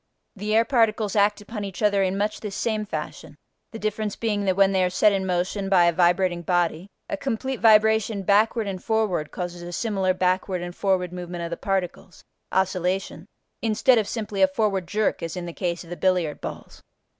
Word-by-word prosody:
The 210 +2 -2
air 225 +1 +4
particles 225 -5 +1
act 205 0 +3
upon 210 0 -6
each 195 +1 -6
other 200 -1 +3
in 190 0 0
much 210 +1 -1
this 205 -3 -6
same 215 -2 -1
fashion, - - -6 0.4
the 225 - -7
difference 215 -1 -2
being 210 -3 -1
that 190 -1 +2
when 195 0 +4
they 190 -1 +2
are 180 - +2
set 185 +4 +4
in 190 -1 -1
motion 185 +2 -1
by 180 -3 +5
a 170 - +3
vibrating 175 +1 +2
body 175 0 0 0.2
a 320 - -2
complete 265 -2 -3
vibration 220 -2 +4
backward 215 +3 +3
and 190 -2 -5
forward 210 -9 0
causes 175 -1 -6
a 175 0 -7
similar 190 -2 0
backward 185 0 0
and 175 0 -7
forward 185 -3 0
movement 175 -1 -6
of 170 - -5
the - - -1
particles 190 -2 -3 0.3
(oscillation) 185 -1 -1 0.3
instead 225 +2 +3
of 210 - -2
simply 210 -3 -3
a 285 - +7
forward 210 -10 -1
jerk 210 +4 0
as 165 +2 -5
in 175 - -4
the 170 - -6
case 170 -1 -3
of 170 - -14
the - - -3
billiard 180 -5 0
balls. - - -8
195 Hz, 200 wpm, -24 LUFS, 180-215 Hz, 0.4 s, a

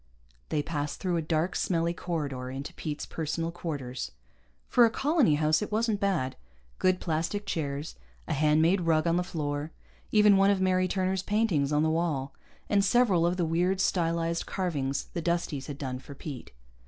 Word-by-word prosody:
They 150 - 0
passed 145 -2 -3
through 180 -3 0
a - - 0
dark, 160 +3 0
smelly 170 -1 0
corridor 145 -8 -3
into 135 +2 -6
Pete's 150 -1 -4
personal 165 +1 -3
quarters. 140 -7 -5 0.5
For 245 - +5
a 230 - +6
colony 275 - +2
house, 155 +1 +2
if 210 - -4
wasn't 220 -1 +1
bad 180 -11 0 0.4
good 185 0 +3
plastic 170 +5 -2
chairs, 145 -4 -3 0.3
a - - -1
hand 155 +2 +3
made 180 +3 +3
rug 160 -1 +2
on 170 0 +2
the 180 - +1
floor, 150 -3 -3 0.4
even 210 -2 +6
one 195 +1 +5
of 200 -1 +3
Mary 185 -1 +2
Turner's 190 0 0
paintings 190 -9 +1
on 150 +1 +3
the 160 - +2
wall, 150 -5 -1 0.3
and 200 -1 +3
several 195 -6 +3
of 175 +1 0
the 175 - +1
weird, 175 +4 +1
stylized 170 -2 0
carvings 145 -8 -1
the 170 - -2
Dusties 165 -5 -1
had 145 - -6
done 130 -3 -4
for 140 +2 -11
Pete. 135 -3 -7
165 Hz, 180 wpm, -28 LUFS, 150-185 Hz, 0.5 s, a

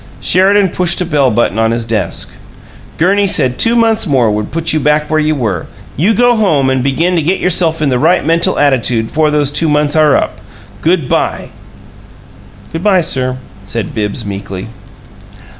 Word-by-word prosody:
Sheridan 195 +2 +3
pushed 175 0 -1
a 180 - -1
bell 145 -5 +1
button 110 -1 0
on 115 0 +2
his 115 0 -2
desk. 105 -6 -3 0.7
"Gurney 200 +4 +2
said 130 -9 0
two 230 +1 +3
months 225 -3 +1
more 125 -7 +2
would 105 0 -3
put 165 0 0
you 155 - +1
back 150 +1 0
where 155 - +2
you 155 0 0
were. 105 - -3 0.3
You 195 - +1
go 245 +1 +3
home 150 -12 +1
and 130 -1 0
begin 165 +7 0
to - - +1
get 175 +5 0
yourself 165 -3 +1
in 145 - +1
the 125 -2 0
right - - +2
'mental 170 +3 +1
attitude' 125 -5 +1
before 155 0 +1
those 145 -2 0
two 155 +2 +1
months 150 0 0
are 155 -2 +4
up! - - -3 0.4
Good 165 -4 +1
by!" - - -2 1.2
"Good 165 +2 -5
by, 195 -3 +3
sir," 130 -4 -2 0.3
said 110 0 -5
Bibbs, 105 +1 -3
meekly. 100 0 -6
150 Hz, 180 wpm, -13 LUFS, 125-175 Hz, 1.2 s, are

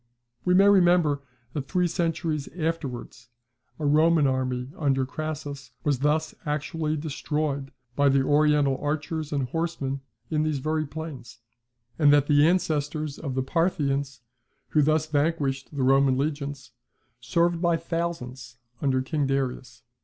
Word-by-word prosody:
We 180 0 +4
may 195 +2 +6
remember 175 -7 +4 0.3
that 140 -2 -4
three 180 -1 +1
centuries 165 -3 -1
afterwards 135 -8 -4 0.5
a 155 - -3
Roman 155 +1 +4
army 130 -1 -1
under 135 -3 +1
Crassus 145 -3 -6
was 145 -4 +1
thus 150 +3 +1
actually 155 +1 -2
destroyed 150 -2 -2 0.3
by 140 0 +4
the 135 0 +3
Oriental 145 -2 +3
archers 155 +1 -2
and 140 -4 -1
horsemen 140 -4 -2 0.3
in 155 -1 +1
these 155 -2 0
very 155 +2 -1
plains; 145 -4 -7
[See - - -24
Mitford.] 120 +1 -47
and 145 0 +7
that 145 -1 +4
the 145 +1 +5
ancestors 155 -4 0
of 135 -5 -4
the 130 - 0
Parthians 140 -4 0 0.5
who 150 - +3
thus 155 +1 +2
vanquished 145 -3 0
the 140 -3 -2
Roman 135 0 +4
legions, 140 -2 -3 0.5
served 170 +7 +1
by 170 -2 +3
thousands 135 -8 -4 0.2
under 130 -2 +1
King 145 +1 -1
Darius. 130 -2 -3
145 Hz, 140 wpm, -26 LUFS, 135-160 Hz, 0.5 s, and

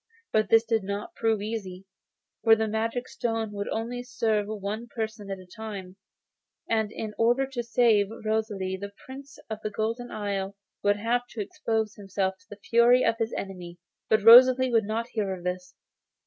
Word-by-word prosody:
But 215 -2 +2
this 225 0 +6
did 225 -2 0
not 200 +2 -4
prove 220 -3 0
easy, 195 -4 -5 0.6
for 225 -1 +7
the 220 0 -1
magic 225 +3 -2
stone 225 -2 -2
would 200 -1 -4
only 235 +2 -3
serve 225 -4 0
for 215 0 -4
one 210 +4 -4
person 220 -3 -5
at 195 - -3
a 185 - -13
time, 195 -2 -8 0.7
and 220 -2 0
in 215 -1 -5
order 240 +4 +3
to 265 -2 -4
save 230 -3 +3 0.2
Rosalie 210 -4 -1
the 200 0 -6
Prince 275 +2 -10
of 220 -1 -5
the 215 - -3
Golden 225 +4 -3
Isle 200 -1 -3 0.3
would 205 0 +3
have 240 +3 0
to 225 - -5
expose 220 +1 -2
himself 195 -1 -2
to 260 - -27
the 205 - -10
fury 240 +2 +5
of 230 0 +1
his 225 0 -1
enemy. 180 -3 -6 0.3
But 215 -1 +3
Rosalie 255 +3 +8
would 225 -3 +3
not 225 +3 -2
hear 205 -5 -2
of 175 - -12
this. 180 0 -4
220 Hz, 180 wpm, -27 LUFS, 200-230 Hz, 0.7 s, Rosalie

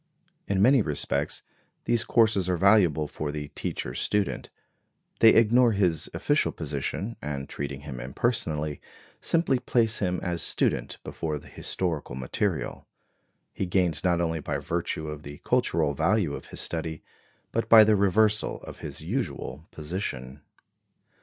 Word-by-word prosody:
In 100 -1 +2
many 130 +1 +6
respects 75 -7 -1 0.4
these 120 -1 +2
courses 110 -5 +3
are 90 - +1
valuable 90 -6 +4
for 75 0 -4
the 75 -1 -5
teacher - - -4
student; 105 +6 -1 0.7
they 115 - +8
ignore 115 +1 +5
his 90 -5 +1
official 145 +1 +1
position, 80 +9 -4
and 70 -2 -4
treating 70 -1 -5
him 70 -3 -7
impersonally, 75 - -1 0.4
simply 165 -6 +2
place 115 -3 +1
him 90 -3 0
as 85 -2 -2
student - - 0
before 80 -2 -3
the - - -13
historical 80 -9 -3
material. 65 -1 -2 0.7
He 95 - -2
gains 90 -4 +1
not 90 -2 +2
only 80 -1 0
by 70 - -3
virtue 85 -2 -3
of 75 -1 -6
the 70 -1 -9
cultural 80 -3 +2
value 85 +1 +1
of - - -7
his - - -5
study, 80 -1 -4 0.5
but 115 0 -1
by 110 -1 +10
the 105 0 +4
reversal 105 +2 +2
of - - -10
his - - -7
usual 70 +7 -4
position. 75 -5 -5
85 Hz, 140 wpm, -27 LUFS, 75-105 Hz, 0.7 s, by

